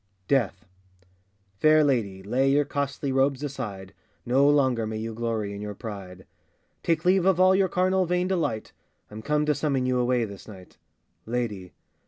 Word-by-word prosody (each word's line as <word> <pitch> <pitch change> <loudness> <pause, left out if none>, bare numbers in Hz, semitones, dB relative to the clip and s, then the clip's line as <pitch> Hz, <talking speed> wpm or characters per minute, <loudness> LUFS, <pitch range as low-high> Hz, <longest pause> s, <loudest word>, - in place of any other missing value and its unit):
] 95 -1 -43
DEATH. 100 -8 -1 0.9
FAIR 155 0 +5
lady, 105 -9 0
lay 130 +7 +1
your 145 +1 +3
costly 140 -1 -3
robes 135 +1 +1
aside, 105 -9 -6 0.3
No 135 +4 +4
longer 130 -6 +2
may 110 0 -4
you 110 +1 -4
glory 110 -3 -3
in 100 - -7
your 105 -1 -6
pride; 95 -5 -8 0.6
Take 165 -1 0
leave 185 0 +3
of 190 -2 +3
all 185 0 +6
your 190 -1 +2
carnal 185 0 +1
vain 180 +1 0
delight, 165 - -2 0.4
I'm 110 +1 -8
come 150 +4 0
to 150 - +2
summon 140 -3 -1
you 125 0 +1
away 125 -1 +1
this 100 -2 -11
night! 95 -4 -13 0.5
LADY. 110 -6 -3
130 Hz, 170 wpm, -26 LUFS, 105-150 Hz, 0.9 s, all